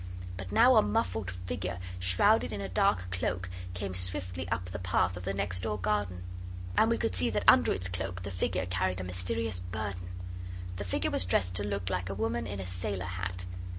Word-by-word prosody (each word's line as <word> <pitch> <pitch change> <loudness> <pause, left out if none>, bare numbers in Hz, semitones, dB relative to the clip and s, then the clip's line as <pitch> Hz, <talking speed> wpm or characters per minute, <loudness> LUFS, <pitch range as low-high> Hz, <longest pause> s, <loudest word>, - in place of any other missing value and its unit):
But 95 0 -6
now 245 - +7
a - - +9
muffled 105 -1 0
figure, 90 0 -4 0.2
shrouded 95 - +4
in 105 - -3
a 100 - -3
dark 95 0 +2
cloak, 90 0 -1 0.3
came 95 +1 -3
swiftly 90 -1 0
up 85 +4 -1
the 90 0 -5
path 90 0 +2
of 90 0 -7
the 100 - 0
next 95 -2 -1
door 105 0 -1
garden. 100 -2 -1 0.5
And 220 - +5
we 230 - +3
could 105 - 0
see 90 -2 +3
that - - 0
under - - +7
its 95 0 0
cloak 90 0 -4
the 100 - -4
figure 90 0 0
carried 90 +1 0
a - - -3
mysterious 90 +3 -1
burden. 90 -1 -4 0.7
The 100 - -4
figure 90 - 0
was - - +3
dressed 90 0 +1
to 100 - -1
look 100 -2 -2
like 90 0 -1
a 100 - -3
woman 115 +3 -1
in 100 - -4
a 95 - -4
sailor 90 +1 -2
hat. 90 0 -4
90 Hz, 205 wpm, -31 LUFS, 90-100 Hz, 0.7 s, a